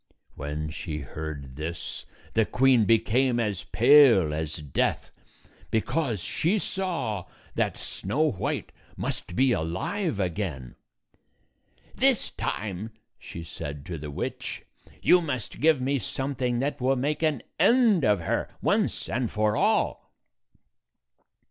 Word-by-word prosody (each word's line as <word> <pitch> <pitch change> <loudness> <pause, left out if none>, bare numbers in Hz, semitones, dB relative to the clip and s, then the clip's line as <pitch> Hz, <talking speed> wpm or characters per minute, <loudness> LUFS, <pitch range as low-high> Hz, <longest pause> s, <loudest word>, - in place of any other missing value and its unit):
When 75 +2 -4
she 80 0 -5
heard 70 -3 -7
this, 80 +3 -5 0.3
the 110 - +4
queen 125 0 +4
became 120 +3 +3
as 105 -5 -2
pale 120 - +6
as 80 0 -3
death, 75 -3 -1 0.6
because 120 - 0
she 180 +7 +1
saw 170 - -2 0.3
that - - 0
Snow 145 +10 -1
White 95 - -3 0.3
must 90 - -4
be 130 +3 +4
alive 100 - -1
again. 85 - -3 0.6
" - - -34
This - - +3
time," 105 +1 -3 0.3
she 85 - -8
said 75 -3 -7
to 85 -3 -5
the 75 0 -6
witch, 70 - -5 0.4
"you 180 - +6
must 130 -9 -4
give 155 -2 +4
me 135 +2 0
something 130 +1 -2
that 140 -1 -2
will 130 +2 +3
make 145 +5 -1
an 155 -6 +1 0.2
end 230 - +5
of 105 -5 +3
her, 80 - -1
once - - 0
and 120 -1 -1
for 105 0 +1
all." - - +1
110 Hz, 125 wpm, -27 LUFS, 80-135 Hz, 0.6 s, pale